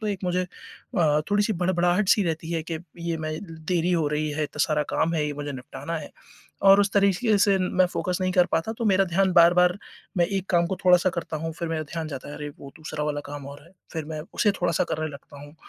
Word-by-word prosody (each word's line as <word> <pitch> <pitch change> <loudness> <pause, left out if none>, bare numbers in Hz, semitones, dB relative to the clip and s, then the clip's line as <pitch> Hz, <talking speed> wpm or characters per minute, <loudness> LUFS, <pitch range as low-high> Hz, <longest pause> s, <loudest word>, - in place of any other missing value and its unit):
तो 215 - -4
एक 200 -2 -2
मुझे 180 0 +1 0.6
अ, 150 -3 +3
थोड़ी-सी 205 +1 +2
हड़बड़ाहट 180 +2 +1
सी 210 - +5
रहती 165 0 -3
है 165 -1 -1
कि 160 - -2 0.2
ये 170 -1 -2
मैं 155 0 -3 0.3
देरी 180 0 +1
हो 165 -3 +2
रही 150 0 -1
है, 155 +1 -2
इतना 150 - -6
सारा 150 -2 +1
काम 165 +1 +1
है, 150 -2 +1
ये 150 - -3
मुझे 145 0 -5
निपटाना 135 +5 -6
है 150 - -9 0.5
और 195 +1 +7
उस 200 0 +2
तरीक़े 200 +2 +3
से 200 -1 +4
मैं 185 0 +2
फ़ोकस 180 0 -2
नहीं 185 0 +1
कर 180 -1 +4
पाता 165 +7 0
तो 230 - -2
मेरा 195 -1 +4
ध्यान 190 +2 +2
बार-बार 180 +1 +6 0.4
मैं 175 - +4
एक 195 0 -2
काम 170 -1 +3
को 190 - -3
थोड़ा-सा 180 0 +5
करता 170 -3 -4
हूँ 165 +1 -4
फ़िर 170 0 -4
मेरा 160 -1 -2
ध्यान 160 +1 -5
जाता 135 -4 -7
है 145 - -7
अरे 150 - -5
वो 140 - -9
दूसरा 155 -1 -5
वाला 150 -1 -2
काम 145 -1 -7
और 140 +1 -11
है 170 - -19 0.2
फ़िर 160 -2 -3
मैं 155 -1 -5
उसे 210 - +3
थोड़ा-सा 175 -2 +1
करने 155 0 -1
लगता 145 0 -12
हूँ, 145 +1 -12
170 Hz, 240 wpm, -25 LUFS, 155-185 Hz, 0.6 s, और